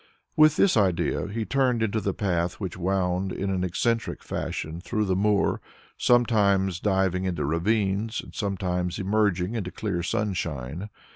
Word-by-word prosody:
With 155 0 +6
this 200 - +4
idea 95 -2 +1
he 110 +2 -3
turned 130 -3 +1
into 110 0 0
the 100 - 0
path 90 -3 0
which 95 -5 -4
wound 95 0 0
in 95 0 -2
an 95 -1 -1
eccentric 115 +6 -1
fashion 80 +2 -4
through 110 +2 -1
the 95 -2 +1
moor, 100 +1 +2 0.3
sometimes 100 -7 +3
diving 95 -2 +1
into 85 -6 -1
ravines, 100 +6 0
and - - -9
sometimes 90 -3 -2
emerging 100 -1 +1
into 105 -6 -3
clear 95 -3 -3
sunshine. 90 -3 -3
95 Hz, 145 wpm, -26 LUFS, 90-110 Hz, 0.3 s, With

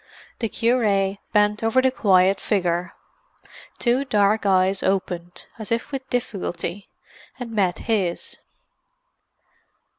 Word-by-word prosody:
The 225 - -1
cure 210 -5 +1
bent 210 -1 +2
over 225 +3 +3
the 260 0 +3
quiet 190 -5 +3
figure. 175 -4 -1 0.8
Two 245 +3 +2
dark 210 -4 +2
eyes 190 0 +3
opened, 180 -2 -2
as 220 - -7
if 230 +5 -1
with 265 -1 -5
difficulty, 200 -5 -4 0.5
and 245 -2 -6
met 195 -5 +1
his. 195 -7 -1
205 Hz, 110 wpm, -23 LUFS, 190-230 Hz, 0.8 s, over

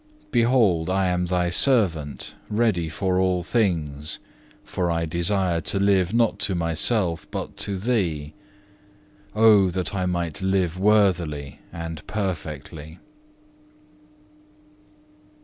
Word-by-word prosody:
Behold, 115 - +2
I 95 0 +1
am 90 0 -1
Thy 90 -1 0
servant, 90 - +1 0.2
ready 105 -7 0
for 95 +3 -1
all 90 -1 +1
things; 80 -8 -1 0.5
for 90 -2 -2
I 85 0 0
desire 85 +1 0
to 100 - 0
live 95 -2 +2
not 115 -1 +1
to 95 - 0
myself 85 +1 0
but - - -6
to 100 -1 +2
Thee. 90 -9 -1 1.0
Oh, 105 -3 +5
that 90 +2 -3
I 95 -2 -1
might 85 -1 -3
live 95 -2 0
worthily 90 -9 +1
and 80 -2 -6
perfectly. 80 -5 -5
90 Hz, 110 wpm, -23 LUFS, 80-100 Hz, 1.0 s, Oh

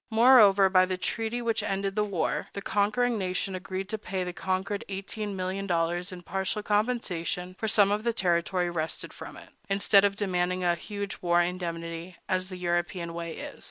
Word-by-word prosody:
Moreover, 220 -4 +7
by 185 -1 +4
the 185 0 -2
treaty 225 +5 -2
which 230 -1 +1
ended 195 0 -2
the 210 - +2
war, 175 -7 -1
the 200 - -5
conquering 215 +3 +1
nation 185 0 -2
agreed 185 +1 -4
to 220 -1 -3
pay 190 -2 -3
the 180 0 -4
conquered 190 +3 -2
eighteen 200 +1 -4
million 190 +1 -3
dollars 175 +1 0
in 180 -1 -9
partial 190 +3 -2
compensation 205 -5 -1
for 220 - -1
some 205 -2 +4
of 210 +1 0
the 235 - +2
territory 180 -3 +1
wrested 160 -1 -4
from - - -9
it, - - -13 0.2
instead 200 0 +4
of 200 -1 +2
demanding 185 -2 0
a 175 -1 +3
huge 200 +4 -5
war 175 -1 +3
indemnity, 170 -1 -3
as 185 -1 -1
the 185 - -6
European 175 -1 -1
way 170 -1 -5
is. - - -8
190 Hz, 185 wpm, -28 LUFS, 175-205 Hz, 0.2 s, Moreover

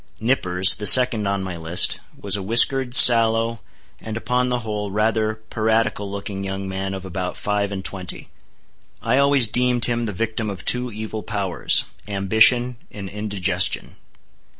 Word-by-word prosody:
Nippers, 95 -6 +2
the 105 - -2
second 120 -3 +6
on 100 -1 -3
my 95 -2 -6
list, 85 +2 +1 0.2
was 100 -1 0
a 100 - -4
whiskered, 125 +5 +3
sallow, 115 -4 +5 0.4
and, 110 0 -7
upon 125 +2 -2
the 125 -1 -3
whole, 105 -2 -5
rather 110 +1 -1 0.2
piratical 110 -2 -2
looking 100 0 -7
young 95 0 -6
man 95 0 -5
of 95 0 -9
about 90 0 -6
five 105 -1 -3
and 95 -1 -7
twenty. 95 -2 -7 0.7
I 130 - 0
always 140 -3 +2
deemed 125 +1 0
him 120 -1 -3
the - - -4
victim 110 +2 -4
of 95 -4 -9
two 125 0 +1
evil 110 0 -7
powers—ambition 105 +4 0
and 100 -2 -9
indigestion. 100 -3 -1
105 Hz, 150 wpm, -20 LUFS, 95-115 Hz, 0.7 s, second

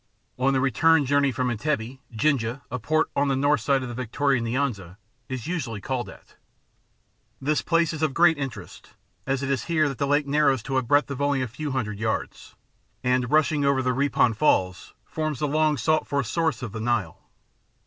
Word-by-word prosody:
On 135 +2 +3
the 135 - +1
return 145 +4 +3
journey 140 +1 +2
from 125 0 -1
Entebbe, 125 0 -2
Jinja, 125 +1 0
a 125 - -3
port 155 +7 0
on 140 +1 +2
the 135 - +1
north 145 +2 +2
side 135 -2 +1
of - - -5
the 120 - -6
Victoria 130 +2 0
Nyanza, 115 -7 -2 0.3
is 130 -4 -5
usually 130 - -3
called 120 0 -3
at. - - -16 1.0
This 150 +3 0
place 165 -1 +1
is 155 - -6
of 155 -4 0
great 170 -1 +5
interest, 130 - -8 0.3
as 135 0 -1
it 140 - -1
is 135 - -1
here 160 -3 +2
that 135 -3 -5
the 140 - 0
Lake 145 +1 +2
narrows 140 -3 +2
into 135 +4 -2
a - - +3
breadth 145 +4 +2
of 140 0 -4
only 140 -2 +1
a - - -2
few 135 +6 -5
hundred 110 -6 -3
yards, 110 0 -4 0.5
and, 125 -1 +1
rushing 155 0 +2
over 140 -1 +2
the 125 0 +1
Ripon 135 -3 +2
Falls, 95 - 0
forms 155 -2 -3
the 150 - -1
long 155 0 +2
sought 155 +4 +1
for 140 -1 0
source 140 0 -1
of 115 - -5
the 110 0 -6
Nile. 110 -7 -1
135 Hz, 200 wpm, -25 LUFS, 120-150 Hz, 1.0 s, great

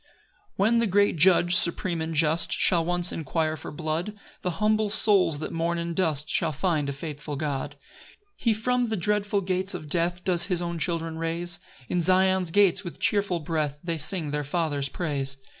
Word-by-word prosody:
1 195 - +1
When 235 +1 +3
the 230 - +2
great 205 0 +3
Judge, 175 +1 +4
supreme 175 -3 0
and 160 0 -3
just, 160 +2 +2
Shall 170 -2 +3
once 175 +1 +2
inquire 155 0 -1
for - - -8
blood, 160 +6 -3 0.3
The 180 - -1
humble 215 0 +2
souls, 200 -6 +3
that 155 - -5
mourn 170 +1 -1
in 170 0 -3
dust, 155 -4 0
Shall 165 - 0
find 155 -1 -1
a - - -1
faithful 150 +1 -6
God. 140 -2 -3 0.5
2 415 - -41
He 230 -3 +2
from 245 +2 0
the 220 - -1
dreadful 205 +2 0
gates 185 0 -1
of 155 -4 -8
death 175 +2 -1
Does 175 -2 +2
his 180 -3 0
own 170 -1 -3
children 165 0 -2
raise: 170 +1 0 0.3
In 180 - 0
Zion's 185 0 +3
gates, 195 +1 +3
with 175 - -8
cheerful 200 -6 +1
breath, 150 -2 -2
They 170 -2 -2
sing 160 -3 +1
their 150 0 -1
Father's 145 -2 -1
praise. 140 -6 -2
170 Hz, 190 wpm, -26 LUFS, 155-190 Hz, 0.5 s, Judge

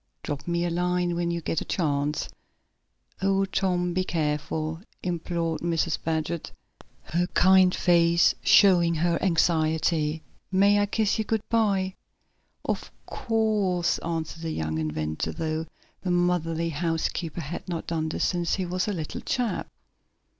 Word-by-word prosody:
"Drop 145 +2 -5
me 170 0 0
a 175 - -1
line 180 0 0
when 170 0 -1
you 170 0 -2
get 160 - -1
a - - -5
chance." 150 -3 -1 0.9
"Oh, 195 0 +2
Tom, 185 -2 0
do 185 - +1
be - - 0
careful," 155 -1 -2 0.2
implored 170 -2 -2
Mrs. 165 -1 0
Baggert, 160 0 -2 0.5
her 175 +2 0
kind 185 0 +6
face 170 -1 +4
showing 175 -4 +5
her 170 +1 +1
anxiety. 160 -2 +1 0.3
"May 200 +2 +4
I 205 - +2
kiss 215 0 +1
you - - +2
good 220 0 -1
by?" 200 -5 +1 0.7
"Of - - -2 0.2
course," 215 -7 0
answered 165 -1 -4
the 165 - -3
young 80 - -2
inventor, 80 0 -2
though 160 0 -3 0.3
the 185 - -3
motherly 175 -2 +1
housekeeper 165 +1 -2
had 165 +5 -6
not 170 -2 -3
done 160 -1 -2
this - - -1
since 175 -2 0
he 190 - -2
was 180 +2 -1
a 210 - 0
little 160 -5 -5
chap. 245 -4 -1
170 Hz, 145 wpm, -26 LUFS, 160-185 Hz, 0.9 s, kind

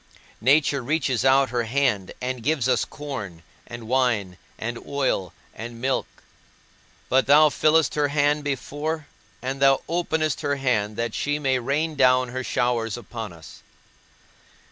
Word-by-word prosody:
Nature 140 +2 +3
reaches 135 -3 0
out 135 0 +4
her 120 -2 0
hand 120 -6 0
and 125 -1 -3
gives 140 -1 0
us 125 -4 +2
corn, 105 - -7 0.2
and 120 -2 -8
wine, 115 -7 +1 0.2
and 120 +1 -4
oil, 135 -10 -1 0.2
and 115 +1 -8
milk; 130 +2 0 1.0
but 130 0 +2
thou 150 +2 +7
fillest 155 +1 +3
her 150 -1 +1
hand 145 +1 +1
before, 145 +3 -3 0.4
and 135 +2 -3
thou 135 -1 +5
openest 160 -3 -1
her 140 0 0
hand 115 -6 0
that 115 -1 -2
she 145 +1 -1
may 135 -3 +1
rain 145 +6 -1
down 130 -2 +3
her 130 +1 -4
showers 120 -3 0
upon 115 -3 -7
us. 85 -2 -13
130 Hz, 145 wpm, -24 LUFS, 120-145 Hz, 1.0 s, thou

